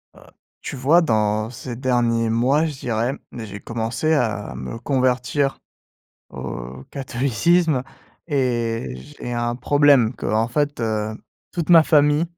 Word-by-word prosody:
Heu, - - -17 0.4
tu - - -6
vois 145 +7 +4
dans, 110 -6 +1
ces 120 0 -7
derniers 120 -2 +1
mois 130 +8 +2
je 150 -4 -5
dirais, 120 +2 -1 0.2
j'ai 105 -4 -7
commencé 115 +8 -1
à 110 - -1
me 65 - -6
convertir, 130 +1 0 0.7
au, 60 +1 -7
catholicisme 140 +4 +1 0.4
et 120 - -1
j'ai 120 - -8
un 120 0 -1
problème 140 -3 +4
qu'en 110 0 0
fait, 145 +1 -1
heu, 110 -1 -1 0.4
toute 170 -3 -3
ma 165 -2 +9
famille 150 0 +4
120 Hz, 125 wpm, -22 LUFS, 110-145 Hz, 0.7 s, ma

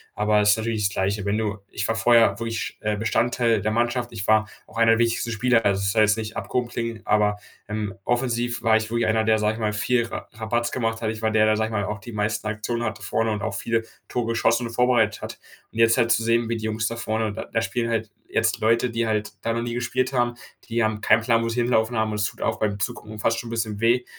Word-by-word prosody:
Aber 105 0 +2
ist 105 0 +4
natürlich 110 -2 0
das 100 - -7
Gleiche, 100 +1 -1
wenn 100 +1 0
du 105 -2 -2
Ich 100 - -3
war 115 - 0
vorher 115 -3 +4
wirklich, 115 -1 -4
äh, 105 -1 -1
Bestandteil 115 +1 +1
der 110 +2 0
Mannschaft. 120 +2 0
Ich 100 -4 -5
war 110 0 +4 0.2
auch - - -12
einer 115 0 +5
der 115 - +1
wichtigsten 115 0 +1
Spieler, 115 +1 +2
also, 100 -1 +2
das 100 0 +1
soll 110 - +3
jetzt 105 +1 +3
nicht 110 0 -5
abgehoben 125 -1 -2
klingen, 115 -2 -4
aber, 105 -1 +2 0.3
ähm, 105 -2 -3
offensiv 120 -1 0
war 110 -1 +4
ich 110 0 -3
wirklich 115 0 +1
einer, 110 0 +2
der, 110 0 +4
sage 105 0 +1
ich - - -8
mal, 105 -2 0
viel 120 +3 +1
Ra - - -7
Rabatz 120 +2 -1
gemacht 115 -2 -2
hat. 110 - -1
Ich 110 0 -7
war 110 0 +1
der, 110 -1 +4
der, 110 0 +3
sage 110 0 0
ich - - -9
mal, 100 -2 -1
auch 105 +1 -4
die 120 +4 -10
meisten 105 +1 -1
Aktionen 110 +2 -2
hatte 110 -2 -3
vorne 115 +1 0
und 105 -1 -2
auch 95 - -2
viele 115 +3 -1 0.2
Tore 120 -2 -2
geschossen 115 +1 +1
und 115 - -9
vorbereitet 120 -3 +2
hat. - - -7 0.3
Und 115 - -7
jetzt 115 +1 +5
halt 120 -1 +3
zu 115 - +3
sehen, 115 0 +2
wie 115 - -1
die 110 - -5
Jungs 110 0 -1
da 115 - -3
vorne 110 -2 -2
da - - -5
da 115 - +1
spielen 115 0 -2
halt 110 -2 -2 0.2
jetzt - - +1
Leute, 115 +3 +3
die 115 0 -1
halt 110 -1 -1
da 115 - 0
noch 115 - -1
nie 120 0 -3
gespielt 125 +2 -1
haben, 120 -2 +1 0.4
die 115 0 +1
haben 110 -1 -1
keinen 115 - +4
Plan, 115 0 +2
wo 115 - -1
sie 120 +1 0
hinlaufen 120 -1 +1
haben, 110 0 +1
und 105 - -3
es 105 - +2
tut - - -6
auch - - -1
beim 105 -2 -1
Zugucken 105 +3 -5
fast 115 +2 +1
schon 115 - -7
'n - - -7
bisschen 110 -3 -2
weh 120 +2 +2
115 Hz, 270 wpm, -24 LUFS, 110-115 Hz, 0.4 s, einer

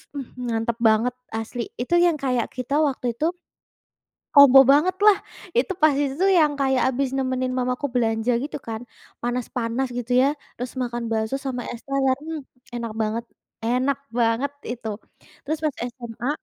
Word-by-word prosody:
Mhm, 250 -3 -5
mantap 225 0 -1
banget 230 +3 +2 0.2
asli. 225 +1 -4
Itu 255 +8 0
yang 345 -3 +3
kayak 250 -4 0
kita 255 +2 -2
waktu 255 -5 -1
itu 300 - -1 1.1
kombo 280 -2 +9
bangetlah 370 +7 +5 0.4
itu 265 +10 +2
pas 310 -1 +6
itu 270 -1 -2
tuh 390 0 +5
yang 310 -5 +4
kayak 265 -2 +2
habis 265 +1 0
nemenin 255 -1 -1
mama 250 0 +1
aku 285 - -2
belanja 225 0 +1
gitu 290 - -5
kan, 220 0 -4 0.4
panas-panas 245 +1 -2
gitu 245 0 -4
ya, 275 - +4 0.3
terus 250 +1 -6
makan 240 -1 -2
bakso 220 +3 0
sama 250 -2 -2
es 235 - -8
teler. 270 -1 +2
Hmm, 315 -1 -5 0.3
enak 235 -2 -4
banget 220 +2 -1 0.4
enak 255 +4 +1 0.2
banget 235 +4 +2 0.2
itu. 235 -2 -5 0.5
Terus 310 +3 -2
pas 300 -3 0 0.2
SMA 235 0 -6
250 Hz, 155 wpm, -23 LUFS, 235-280 Hz, 1.1 s, kombo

